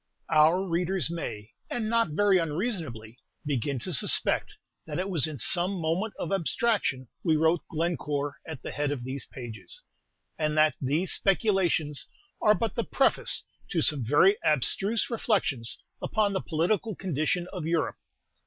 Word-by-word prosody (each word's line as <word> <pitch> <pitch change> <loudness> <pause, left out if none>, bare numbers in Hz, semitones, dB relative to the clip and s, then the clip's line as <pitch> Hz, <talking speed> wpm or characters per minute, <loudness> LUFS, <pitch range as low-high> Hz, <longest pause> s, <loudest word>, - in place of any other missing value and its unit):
Our 160 +4 +5
readers 175 0 0
may, 110 -10 -6 0.2
and 225 -3 -2
not 230 -3 +2
very 195 +4 +3
unreasonably, 155 - -3 0.3
begin 140 -1 -1
to 180 - -1
suspect 130 - +4 0.3
that 150 -2 -4
it 190 +2 -2
was 160 -5 +4
in 155 -2 -6
some 180 +7 +3
moment 170 +7 -1
of - - -4
abstraction 195 - 0 0.2
we 160 -3 +3
wrote 160 +2 +2
"Glencore" 150 -3 -2
at 160 -5 -8
the - - -5
head 145 0 -1
of 140 -4 -3
these 130 +2 -5
pages, 120 - -9 0.6
and 155 -1 0
that 155 0 +5
these 150 +8 0
speculations 185 -7 +1 0.3
are 210 0 +5
but 230 0 -2
the 235 - -1
preface 270 - +2 0.3
to 165 -4 0
some 145 -5 +1
very 150 - +4
abstruse 195 - +1
reflections 190 - 0 0.2
upon 210 -2 0
the 190 - -1
political 190 +6 -1
condition 175 0 -1
of 175 -5 -4
Europe. 165 -1 0
165 Hz, 150 wpm, -27 LUFS, 145-195 Hz, 0.6 s, Our